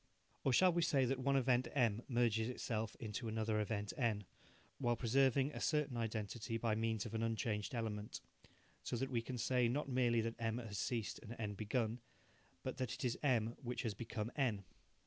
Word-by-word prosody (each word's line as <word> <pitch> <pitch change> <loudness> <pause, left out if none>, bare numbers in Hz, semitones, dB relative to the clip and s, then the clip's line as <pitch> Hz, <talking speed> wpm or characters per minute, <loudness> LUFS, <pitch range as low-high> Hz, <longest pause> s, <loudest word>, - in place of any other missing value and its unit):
Or 135 - +3
shall 180 +7 +6
we 170 - +2
say 140 -5 +3
that 130 +1 0
one 140 +1 +2
event 130 -1 +3
M 115 -5 +3
merges 120 -2 +2
itself 110 -3 -2
into 110 +1 -4
another 110 -1 0
event 105 -1 -1
N, 110 -5 +1 0.6
while 120 -2 +2
preserving 135 +3 +3
a - - -6
certain 150 -4 +1
identity 115 0 -2
by 115 -1 +1
means 110 -1 0
of 110 - -6
an 110 - -1
unchanged 115 -1 -1
element, 110 -2 -3 0.6
so - - -3
that 135 +3 -2
we 120 -2 +1
can 125 +2 -5
say, 125 +1 +3
not 140 +4 -1
merely 120 -3 +3
that 115 +1 -1
M 115 0 0
has 110 -5 -4
ceased 115 -2 -1
and 115 +1 -8
N 105 -2 -2
begun, 110 +2 -1 0.6
but 130 - -3
that 125 -1 -2
it 130 - -4
is 120 - +1
M 120 -5 +2
which 125 0 -3
has 115 -4 -1
become 110 +1 -4
N? 115 -8 +1
115 Hz, 190 wpm, -39 LUFS, 110-130 Hz, 0.6 s, shall